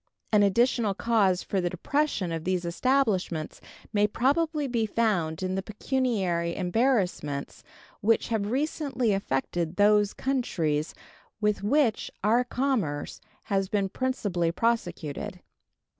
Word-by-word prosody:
An 210 -2 +5
additional 215 +1 +2
cause 200 -5 +2
for 195 - -1
the 175 - 0
depression 280 - -1
of 165 -1 -3
these 180 0 -1
establishments 185 - 0 0.3
may 205 0 +3
probably 295 +7 +1
be 235 -4 0
found 190 -8 0
in 185 0 -1
the 190 - -1
pecuniary 200 -7 -1
embarrassments 180 - 0 0.4
which 225 +4 +2
have 210 -3 -1
recently 265 -3 0
affected 170 -1 -2
those 205 0 +4
countries 165 - -1 0.4
with 210 -2 +1
which 235 +2 +2
our 230 +4 +4
commerce 245 - -2 0.2
has 195 -2 -1
been 200 -2 0
principally 200 -9 -1
prosecuted. 175 -8 -2
205 Hz, 115 wpm, -27 LUFS, 175-245 Hz, 0.4 s, An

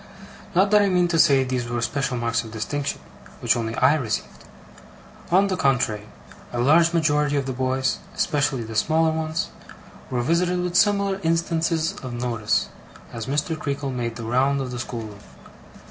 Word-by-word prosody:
Not 195 +3 +4
that 210 -1 +6
I 200 - +3
mean 180 -1 +3
to 165 -1 +1
say 140 -4 +5
these 125 -2 -2
were 120 0 -1
special 130 +2 -1
marks 115 0 0
of 115 - -9
distinction, 125 +6 -3 0.4
which - - +2
only 115 -1 -3
I 145 - +4
received. 120 -9 -3 0.8
On 190 +3 +4
the 195 -2 -1
contrary, 125 - 0 0.4
a 120 - -3
large 160 +7 +5
majority 150 -3 +2
of 140 -2 0
the 130 - -3
boys 130 +1 0 0.2
(especially 140 -6 0
the 110 0 -8
smaller 160 +7 +2
ones) 160 +1 -2 0.6
were 125 -1 -1
visited 175 +5 +1
with 180 0 -3
similar 200 -1 +3
instances 165 -1 0
of 130 -2 -6
notice, 120 -3 -1 0.4
as 115 0 -5
Mr. 150 +4 -1
Creakle 140 -2 -3
made 120 -2 -3
the 115 - -7
round 135 +4 +2
of 130 -2 -4
the 125 - -5
schoolroom. 110 -4 -6
140 Hz, 170 wpm, -23 LUFS, 120-165 Hz, 0.8 s, that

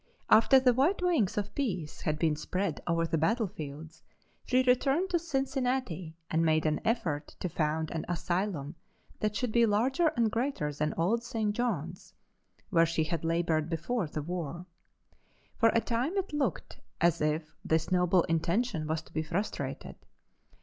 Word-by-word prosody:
After 230 +5 +7
the 255 -1 +4
white 310 +10 +2
wings 320 - +2
of 205 0 -2
peace 185 - -3
had 155 0 -1
been 155 -1 +1
spread 180 +2 -2
over 165 -1 +1
the 165 -1 0
battlefields 160 - -2 0.5
she 255 0 +3
returned 270 +8 +2
to 345 - +2
Cincinnati 260 - -2 0.2
and 160 +1 +2
made 155 -1 +2
an 155 -1 +1
effort 165 -10 -1
to - - -2
found 160 -1 -1
an 165 - -3
asylum 175 -3 -2 0.5
that 210 -1 -1
should 250 +1 -1
be 235 0 +4
larger 260 +11 +2
and 230 -2 +2
greater 230 - -1
than 150 +2 -2
old 220 +8 +1
St. 225 -4 -1
John's, 185 -9 -3 0.6
where 165 -2 +5
she 165 -1 0
had 165 0 -3
labored 165 -1 +1
before 170 +5 -1
the 150 0 -4
war. 170 0 -4 0.9
For 230 - +6
a 230 - +4
time 250 - -1
it 385 -5 -2
looked 295 -2 -2 0.2
as 170 -2 +2
if 155 +1 -1
this 160 -3 0
noble 180 -1 +4
intention 165 +1 0
was 160 0 -2
to - - -20
be 155 - 0
frustrated. 175 +7 -4
180 Hz, 160 wpm, -30 LUFS, 160-240 Hz, 0.9 s, After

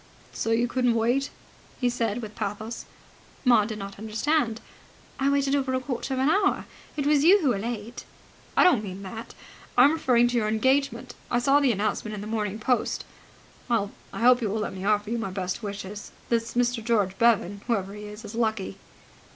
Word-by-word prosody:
"So - - -2
you 230 +2 +2
couldn't 250 -1 +1
wait!" 245 +5 +1 0.5
he 250 - +2
said 235 -1 -1
with 215 -1 -8
pathos. 220 +3 -4 0.6
Maud 230 -4 +5
did 220 -2 -5
not 200 -1 -8
understand. 225 +2 0 0.6
"I 270 +1 +2
waited 280 0 +2
over 265 -2 0
a - - +1
quarter 260 0 -3
of - - -2
an 265 - +2
hour. 390 +5 +2 0.3
It 285 - -1
was 290 -1 +4
you 380 +5 +7
who 280 - +3
were 215 -5 +1
late." 230 +1 -5 0.5
"I - - +7
don't 330 - +4
mean 195 0 -7
that. 225 +4 -8 0.4
I 245 - +8
am 285 - +6
referring 245 -6 +3
to 245 - 0
your 215 -2 +1
engagement. 260 +6 +1 0.2
I - - +1
saw 275 +4 +4
the 275 -3 +3
announcement 215 +1 -2
in 200 - -6
the - - -6
Morning 215 -2 -2
Post. 245 +3 0 0.6
Well, 215 -4 +1 0.2
I - - -6
hope 250 +1 +6
you 220 - 0
will 215 +2 -1
let 210 - -3
me 190 0 -7
offer 210 +1 +1
you 235 - 0
my 225 - -3
best 185 +2 -3
wishes. 200 -1 -6 0.2
This 230 0 0
Mr. 245 -1 +1
George 210 -5 +1
Bevan, 205 -4 +3
whoever 200 -5 -1
he 210 0 -8
is, 210 +2 -9
is 210 - -8
lucky." 220 -4 -1
230 Hz, 200 wpm, -26 LUFS, 210-250 Hz, 0.6 s, I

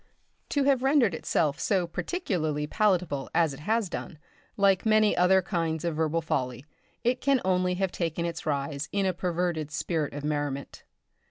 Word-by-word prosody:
To 285 - +1
have 270 -2 +3
rendered 265 - +3
itself 155 -2 0
so 190 -4 +1
particularly 170 - -2
palatable 180 -6 0
as 165 -4 +3
it 135 - -10
has 220 +6 0
done, 170 -2 -6 0.4
like 195 -2 +3
many 215 -1 +4
other 185 +1 +4
kinds 165 -3 -2
of 170 -2 -1
verbal 160 +1 0
folly, 130 -3 -2 0.4
it 245 +2 +1
can 275 -1 +3
only 180 -1 +2
have 190 0 -1
taken 170 -1 -2
its 165 -2 -5
rise 140 0 -2
in 200 -1 0
a 185 - +1
perverted 175 -3 -1
spirit 155 -1 -2
of 145 - -5
merriment. 145 -2 -3
170 Hz, 165 wpm, -27 LUFS, 150-195 Hz, 0.4 s, many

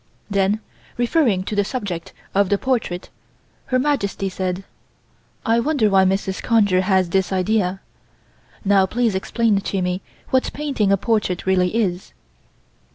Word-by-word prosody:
Then, 200 +2 +1 0.4
referring 240 - +2
to 210 - -4
the 205 - +3
subject 200 -8 -4 0.2
of 200 -1 +2
the 200 - +3
portrait 225 -8 -2 0.6
Her 255 - +2
Majesty 250 -8 0
said: 185 0 -3 0.8
"I 230 -1 +3
wonder 235 -5 +2
why 190 -1 +5
Mrs. 190 0 -1
Conger 205 -6 +3
has 185 -2 +2
this 190 +1 +1
idea. 190 0 0 0.8
Now 195 -1 +4
please 230 +1 +1
explain 205 +2 +1
to 195 -1 -2
me 180 +1 -1 0.3
what 260 -1 +2
painting 275 -9 0
a 195 - +4
portrait 200 -4 0
really 185 +1 +2
is." 190 -5 -1
200 Hz, 140 wpm, -21 LUFS, 190-230 Hz, 0.8 s, why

